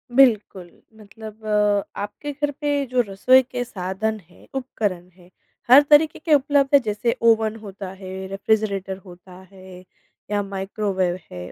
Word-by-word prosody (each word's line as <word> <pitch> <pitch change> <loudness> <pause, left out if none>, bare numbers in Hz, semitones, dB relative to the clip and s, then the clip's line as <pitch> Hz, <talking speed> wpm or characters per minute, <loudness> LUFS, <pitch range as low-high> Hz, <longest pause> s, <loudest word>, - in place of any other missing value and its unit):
बिल्कुल। 210 -9 +3 0.3
मतलब 215 +1 -12 0.5
आपके 205 +8 -5
घर 290 +1 -2
पे 290 -1 0
जो 250 - +4
रसोई 250 +7 +4
के 245 0 -4
साधन 215 +1 -3
हैं, - - -20
उपकरण 205 -9 -3
हैं, 180 0 -21 0.4
हर 265 +4 +10
तरीके 310 +1 +5
के 315 0 +1
उपलब्ध 280 -1 +3
हैं? 280 - +6
जैसे 220 +1 -1
ओवन 225 -1 +3
होता 195 -2 -8
है, 190 0 -8
रेफ्रिजरेटर 195 -1 -1
होता 180 0 -14 0.2
है 185 -1 -13 0.5
या 205 - +1
माइक्रोवेव 195 -2 -2
है, 90 0 -8
210 Hz, 140 wpm, -22 LUFS, 190-250 Hz, 0.5 s, हर